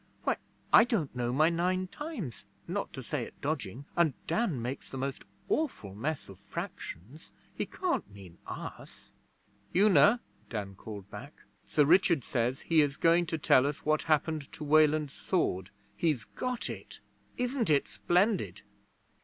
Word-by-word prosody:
'Why, - - +1 0.4
I - - +10
don't 210 - -1
know 120 -1 0
my 155 +5 +4
Nine 180 +2 +1
Times 205 - -6 0.2
not - - -2
to - - -6
say - - -2
it - - -8
dodging, 120 +9 -3
and 165 -6 +3
Dan 195 - 0
makes 125 +4 -5
the 135 - -6
most 135 +1 -3 0.2
awful 240 - -1
mess 140 +9 -3
of 95 -2 -12
fractions. 100 - -7 0.2
He - - -3
can't 365 - -1
mean 95 -4 -13
us!' - - -8 0.6
'Una!' 205 - +6 0.3
Dan 100 -4 -4
called 100 0 -9
back. 145 - -10 0.2
'Sir 150 - +4
Richard 170 -3 +5
says 125 +3 0
he 165 -2 +4
is 145 -1 0
going 170 +1 +4
to 160 - -1
tell 140 -2 +4
what 155 +1 0
happened 155 -1 0
to - - -7
Weland's 150 -1 +4
sword. 95 - -1 0.3
He's 155 -8 +1
got 250 -1 -3
it. - - -8 0.4
Isn't 250 - 0
it 140 -8 +3
splendid?' 140 - +1
150 Hz, 150 wpm, -31 LUFS, 120-175 Hz, 0.6 s, I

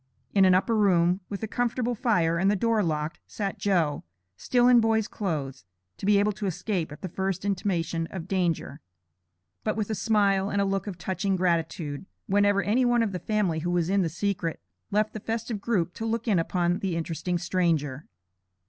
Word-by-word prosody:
In 195 -2 +5
an 185 -1 +6
upper 225 +5 +2
room, 180 -3 +3
with 200 +1 -5
a - - -1
comfortable 245 +1 -1
fire, 175 -8 +1
and 190 +3 +3
the 205 - +3
door 225 +2 +2
locked, 155 -3 -2
sat 200 -2 -4
"Joe," 170 -8 +1 0.3
still 245 - +2
in 250 -1 +7
boy's 220 -1 +2
clothes, 145 -9 -4 0.3
to 195 - -5
be 205 -1 +5
able 205 +1 +3
to 205 0 -4
escape 180 -2 -2
at 150 - -11
the - - -2
first 190 +1 -3
intimation 175 -4 -1
of 180 -2 -6
danger, 175 -5 -1 0.8
but - - -1
with 215 0 -2
a - - +1
smile 200 -1 +2
and 200 - 0
look 195 +1 -2
of 190 -4 -5
touching 190 +3 -1
gratitude, 170 -3 -1 0.2
whenever 205 0 +3
any 235 +5 +2
one 240 -1 +3
of 215 - -1
the 180 - -4
family 195 -4 0
who 175 +3 -2
was 175 0 +1
in 200 0 +3
the 170 - 0
secret, 170 -1 -2 0.3
left 210 +1 +1
the 215 - -5
festive 225 0 -3
group 180 -6 0
to 225 - -5
look 230 +1 -2
in 200 -6 +3
upon 175 +1 0
the 190 -4 -2
interesting 170 +2 -2
stranger. 165 -6 -1
190 Hz, 195 wpm, -27 LUFS, 170-210 Hz, 0.8 s, in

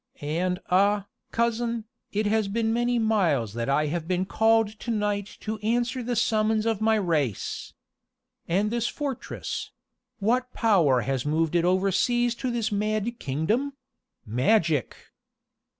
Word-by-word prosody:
And 175 +5 -1
ah, 200 +2 +3 0.3
cousin, 235 -1 0 0.3
it 210 +1 0
has 215 0 +2
been 225 +2 0
many 240 +1 +1
miles 175 - +1
that 115 +2 -3
I 150 +2 +2
have 160 +2 -3
been 185 +1 0
called 225 +1 +3
to - - -7
night 205 -2 -1
to 215 0 -4
answer 240 +4 0
the 245 0 -2
summons 215 -1 +2
of 225 -2 0
my 220 0 +4
race. 160 - -1 0.7
And 200 +5 +1
this 235 0 0
fortress 280 -4 -4 0.5
what 250 +5 0
power 170 - +4
has 130 +1 -1
moved 155 +2 0
it 170 -1 +2
overseas 200 +6 +2
to 255 - 0
this 235 -2 -1
mad 215 +3 -1
kingdom? 210 - -1 0.5
Magic!" 145 - +2
210 Hz, 135 wpm, -26 LUFS, 170-230 Hz, 0.7 s, my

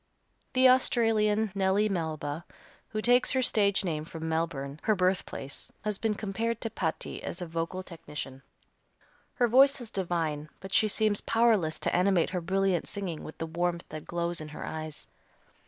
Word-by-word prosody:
The 260 0 +6
Australian, 220 -4 +3
Nellie 195 +2 +2
Melba, 160 -4 -3 0.4
who 215 -1 -4
takes 245 +1 +5
her 260 -1 +2
stage 200 -4 +3
name 155 -3 -1
from 160 0 -6
Melbourne, 155 -3 -2
her 215 - +2
birthplace, 180 -7 -1
has 210 -2 -1
been 220 -2 0
compared 225 +3 -2
to 225 - -3
Patti 165 -7 -3
as 175 - -4
a 180 - -3
vocal 165 +3 -3
technician. 150 -6 -7 0.9
Her 245 - +3
voice 270 +4 +6
is 240 -3 -8
divine, 165 -5 -2
but 190 -1 -8
she 220 - +5
seems 215 -1 +1
powerless 220 -9 +2
to - - +1
animate 180 -2 +3
her 180 -2 -2
brilliant 190 0 +1
singing 185 -6 -4
with 155 - -9
the 165 - -3
warmth 170 +1 -1
that 155 -1 -7
glows 170 -1 -1
in 155 - -6
her 150 - -7
eyes. 155 -1 -6
185 Hz, 165 wpm, -29 LUFS, 160-215 Hz, 0.9 s, The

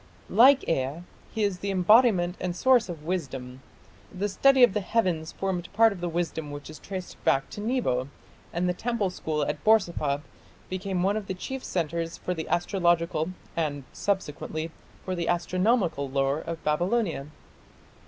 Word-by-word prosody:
Like 260 +6 +6
Ea, 145 +2 -1 0.3
he 220 - -1
is 200 -3 0
the 200 - -3
embodiment 190 -1 +4
and 180 -1 -2
source 245 0 +4
of 165 -4 -7
wisdom.... 135 -7 -4 0.5
The 200 +3 -2
study 265 +6 +5
of 240 - +6
the 210 - +1
heavens 180 -6 0
formed 185 -3 -3
part 225 0 +5
of 180 - -10
the 175 - -1
wisdom 165 -2 -2
which 145 +1 -8
is 155 - -11
traced 190 -2 -7
back 135 0 +2
to 205 - -6
Nebo, 215 - 0 0.4
and 175 +2 0
the 180 - +1
temple 220 -1 -1
school 155 -4 -2
at - - -3
Borsippa 170 -10 +2 0.5
became 185 -1 -2
one 200 +3 +2
of 210 -3 -5
the 190 - -3
chief 265 +8 -5
centres 165 -1 -2
for 180 - -3
the 160 -2 -5
astrological, 170 -3 +1 0.3
and, 145 -4 -1
subsequently, 160 -4 -2 0.3
for 185 - -2
the 175 -2 -2
astronomical 175 - +1
lore 135 +2 +1
of 165 0 -6
Babylonia.... 175 0 0
175 Hz, 165 wpm, -27 LUFS, 160-200 Hz, 0.5 s, Like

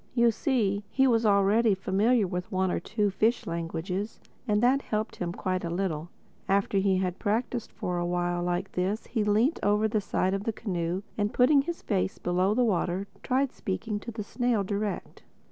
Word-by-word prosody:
You 235 -1 +5
see, 215 -4 0
he 265 - +3
was 230 -3 +3
already 200 +2 +4
familiar 205 +5 +2
with 180 +3 -4
one 190 -1 +1
or - - 0
two 210 +2 -1
fish 220 +5 +1
languages; 170 +5 -3 0.3
and 210 -1 +2
that 265 +3 +4
helped 215 -2 -3
him 175 -1 -2
quite 185 0 -2
a 170 - -2
little. 170 -3 -2 0.4
After 195 0 +2
he 190 -1 +2
had 185 -1 -2
practised 230 +2 -1
for 180 -1 -3
a 175 - -1
while 175 0 0
like 175 +2 -2
this 190 +5 -1
he 225 -3 -1
leant 215 +9 +2
over 210 +1 +3
the 215 0 0
side 190 -1 0
of 195 +1 -2
the 225 - 0
canoe 180 -2 -2 0.2
and 205 0 +1
putting 275 +3 +5
his 340 +4 -5
face 195 -2 -1
below 185 +3 +1
the 250 - +3
water, 185 -2 0 0.2
tried 260 +1 +1
speaking 205 +2 -3
to 235 - -8
the 220 -2 -5
snail 235 0 0
direct. 205 +1 -3
200 Hz, 190 wpm, -28 LUFS, 185-225 Hz, 0.4 s, You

